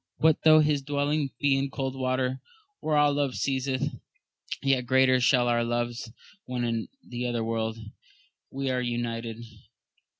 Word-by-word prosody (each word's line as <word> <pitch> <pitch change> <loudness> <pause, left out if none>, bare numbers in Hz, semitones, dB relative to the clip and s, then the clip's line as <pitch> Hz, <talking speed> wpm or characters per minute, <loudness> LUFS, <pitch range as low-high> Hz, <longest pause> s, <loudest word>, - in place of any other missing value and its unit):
What 160 -1 +3
though 155 -1 +7
his 150 -2 +2
dwelling 145 +1 0
be 140 -1 +3
in 135 0 +1
the - - -5
cold 135 -1 -3
earth, 130 0 -1 0.4
where 155 -1 0
all 145 -1 +4
love 140 -3 0
ceaseth, 135 +1 -1 0.6
yet 135 -3 +2
greater 130 0 +4
shall 125 0 +4
be 120 - +2
our 120 0 +2
loves 120 0 -2 0.3
when 125 -1 -3
in 115 -1 -1 0.2
the 125 0 -3
other 120 -2 -1
world 110 0 -2 0.7
we 135 0 -2
are 125 0 0
united 120 -1 -3
130 Hz, 160 wpm, -27 LUFS, 120-140 Hz, 0.7 s, though